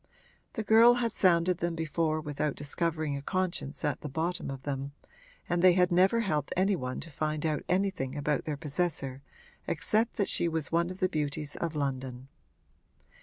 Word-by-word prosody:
The 220 - -3
girl 225 +3 +7
had 235 -2 0
sounded 180 -2 +3
them 170 -1 -1
before 160 -1 0
without 150 -1 -2
discovering 155 0 0
a 140 - -4
conscience 175 -3 -2
at 150 - -1
the 150 - -5
bottom 160 +4 -2
of 135 -1 -6
them, 140 0 -4 0.5
and 175 0 0
they 185 0 +7
had 180 0 +3
never 190 +6 +4
helped 150 -9 -1
any 195 +2 +3
one 130 -6 -4
to 165 - -9
find 155 +1 -2
out 155 -2 0
anything 180 -8 0
about 145 0 -1
their 150 -2 -3
possessor 145 -3 -2 0.5
except 220 +2 +1
that 200 - 0
she 170 - +1
was 160 -3 -2
one 170 +1 +2
of 185 - -7
the 185 - +4
beauties 150 -2 -3
of 165 -2 -3
London. 130 -2 -3
160 Hz, 175 wpm, -30 LUFS, 145-180 Hz, 0.5 s, girl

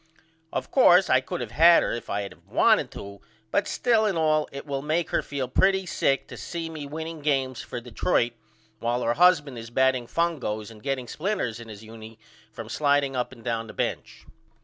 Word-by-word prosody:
Of - - -4
coarse 185 -8 +6
I 130 - +5
could 130 - -4
of 110 - -8
had 165 +7 +6
her - - -1
if 120 - -5
I 100 - -1
had 100 - -7
of - - -26
wanted - - +3
to 100 0 -9 0.3
but - - +1
still 225 -3 +2
and 195 -5 -1
all 155 -1 +2
it 140 - -8
will 140 -2 -3
make 155 +3 -1
her - - +2
feel 140 -3 -4
pretty 190 +8 +2
sick 135 -5 0
to - - -9
see 165 -1 -5
me 150 -3 -7
winning 160 +2 -6
games 135 -4 0
for 120 - -6
Detroit 120 0 0 0.5
while 120 +1 -1
her 115 - +1
husband 150 -6 +3
is 115 0 -9
batting 130 0 +1
fungos 125 -11 -2
and 110 -1 -14
getting 135 -1 -3
splinters 155 - -2
in 115 - -10
his 105 0 -10
unie 110 0 -11 0.3
from - - -8
slideing 145 -2 +1
up 125 - -2
and 120 -3 -14
down 115 -1 -2
the - - -10
bench. - - -4
135 Hz, 205 wpm, -26 LUFS, 120-160 Hz, 0.5 s, coarse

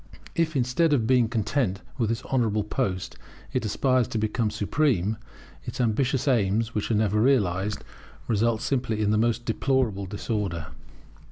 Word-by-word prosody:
If, 165 -3 0
instead 135 +5 +2
of 120 -6 +2
being 125 -2 +3
content 110 -3 0 0.2
with 115 -3 +1
this 115 +2 -2
honourable 110 -5 +1
post, 100 -4 -2 0.4
it 130 - 0
aspires 130 +3 +2
to - - -3
become 110 +1 0
supreme, 105 - 0 0.5
its - - -7
ambitious 125 +3 +1
aims, 115 -2 +2
which 105 - -2
are 115 - +2
never 105 0 +2
realized, 105 -6 +1 0.4
result 115 0 +1
simply 125 -5 -1
in 105 -1 +2
the 105 - +3
most 120 +1 +1
deplorable 115 -5 0
disorder. 95 -5 -3
110 Hz, 150 wpm, -26 LUFS, 105-125 Hz, 0.5 s, being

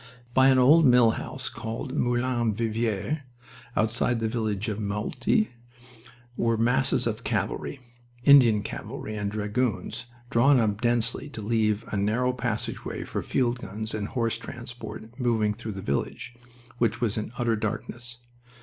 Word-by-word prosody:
By 130 +1 +6
an 135 -1 +6
old 145 +6 +7
mill 125 -2 +6
house - - -5
called 110 0 -5
the - - -6
Moulin 120 -2 +1
Vivier, 115 +4 -1 0.5
outside 115 +2 +1
the 115 - 0
village 110 -3 -2
of 105 -1 -2
Meaulte, 105 - 0 0.9
were 115 -2 +1
masses 120 +3 +2
of - - -2
cavalry 140 - -2 0.4
Indian 120 -7 +7
cavalry 110 0 -6
and 105 -1 -2
Dragoons 110 +3 -2 0.3
drawn 135 +3 +5
up 105 -2 0
densely 120 +3 +1
to 115 - -7
leave 110 -1 +1
a 105 - -2
narrow 115 +6 +1
passageway 120 -3 -3
for - - -3
field 125 -2 0
guns 110 +1 -4
and 105 -1 -2
horse 115 -2 -1
transport 120 -1 -8
moving 110 -4 +2
through 110 0 -6
the 95 - -6
village, 70 - -2 0.5
which 115 -1 +1
was 115 -4 0
in 110 0 -3
utter 120 -2 +1
darkness. 120 +3 -4
115 Hz, 145 wpm, -27 LUFS, 110-120 Hz, 0.9 s, old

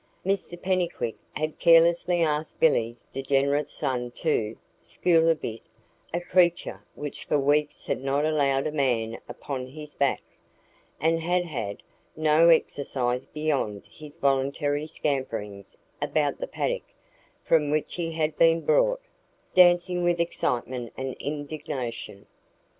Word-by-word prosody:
Mr 190 -2 -1
Pennycuick 180 -11 -1 0.2
had 155 0 -3
carelessly 170 +1 +5
asked 155 0 -1
Billy's 120 -7 +2
degenerate 140 +2 +1
son 125 -2 -2
to 115 -5 -1 0.2
"school 165 - +2
a 165 - +4
bit" 115 -7 -6 0.5
a 175 - -1
creature 175 -1 +1
which 145 -1 -6
for - - +2
weeks 145 +1 +1
had - - -2
not 140 +2 +1
allowed 140 -3 +2
a 155 - -1
man 120 -6 0
upon 130 -3 -5
his 150 +2 -10
back, 140 -2 0 0.8
and 165 +2 +2
had 175 +2 0
had 115 -11 -5 0.3
no 155 +2 +5
exercise 130 -6 +1
beyond 140 -10 -2
his 150 -1 -12
voluntary 145 +1 0
scamperings 115 -10 -4 0.2
about - - 0
the - - -3
paddock - - -3 0.5
from 150 -3 +3
which 150 +1 -1
he 165 -2 -3
had 155 -1 -1
been 165 0 +5
brought, - - +2 0.5
dancing 175 0 +5
with 175 0 +1
excitement 125 -7 -1
and 130 0 -3
indignation. 140 -8 -5
150 Hz, 125 wpm, -26 LUFS, 130-165 Hz, 0.8 s, carelessly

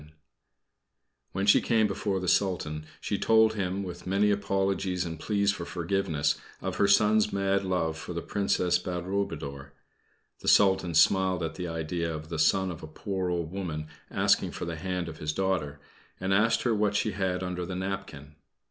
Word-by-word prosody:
When 95 +1 -1
she 100 - +6
came 110 -2 +3
before 100 -1 -1
the 90 - -4
Sultan, 80 -6 0
she 100 - -2
told 110 -1 +4
him, 100 -1 -2
with 90 -1 -8
many 100 +2 +3
apologies 95 -2 0
and 80 -2 -6
pleas 100 +1 +1
for 100 -3 -5
forgiveness, 85 -3 -1 0.2
of - - -4
her 100 - +4
son's 105 +1 +4
mad 100 0 +1
love 80 -4 -1
for 90 - -6
the 85 - -4
Princess 90 -3 +1
Badroulboudour. 85 -7 -4 0.7
The - - -9
Sultan 95 -4 +4
smiled 95 +1 +4
at 80 - -3
the 90 -1 -5
idea 80 +1 -2
of 80 0 -6
the 80 -2 -4
son 95 +4 +3
of 80 - -8
a - - -8
poor 95 +3 -3
old 85 -2 -2
woman 80 -5 -4 0.2
asking - - +2
for - - -5
the 85 -1 -4
hand 90 0 -3
of 80 -1 -8
his 75 0 -2
daughter, 80 -6 -1 0.4
and 95 +1 0
asked 110 +3 +3
her 120 - +2
what 105 -1 +1
she 105 - +1
had 95 -1 -1
under 90 -1 -3
the 90 +1 -5
napkin. 95 -6 -5
95 Hz, 175 wpm, -28 LUFS, 85-100 Hz, 0.7 s, she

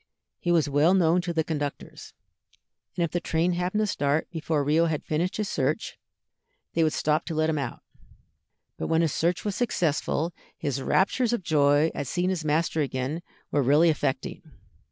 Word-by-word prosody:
He 175 - -1
was 165 -3 +3
well 145 +6 +4
known 175 -1 +3
to 175 -1 -3
the 160 -1 +1
conductors, 145 -3 -5 0.8
and 175 - +2
if 170 - -1
the 175 - 0
train 165 +1 0
happened 180 +4 -1
to - - +2
start 145 -5 0
before 160 -3 -1
Rio 155 +4 +3
had 155 -2 -2
finished 170 +4 -1
his 210 -1 -1
search, 145 +8 -2 0.7
they 165 - +2
would 155 - +2
stop 155 0 +1
to 165 - -4
let 155 +1 +2
him 155 - -1
get - - 0
out. - - -24 1.0
But - - -2
when 165 0 +2
his 155 -4 0
search 175 +4 0
was 205 - -1
successful, 170 -6 0 0.2
his 140 -3 -2
raptures 230 - +2
of 235 - -1
joy 145 0 +3
at 145 - -4
seeing 180 +6 0
his 180 -4 -2
master 155 +1 +1
again 135 +3 -2 0.3
were 145 - +2
really 150 +6 +5
affecting. 140 -3 -2
160 Hz, 185 wpm, -26 LUFS, 150-175 Hz, 1.0 s, really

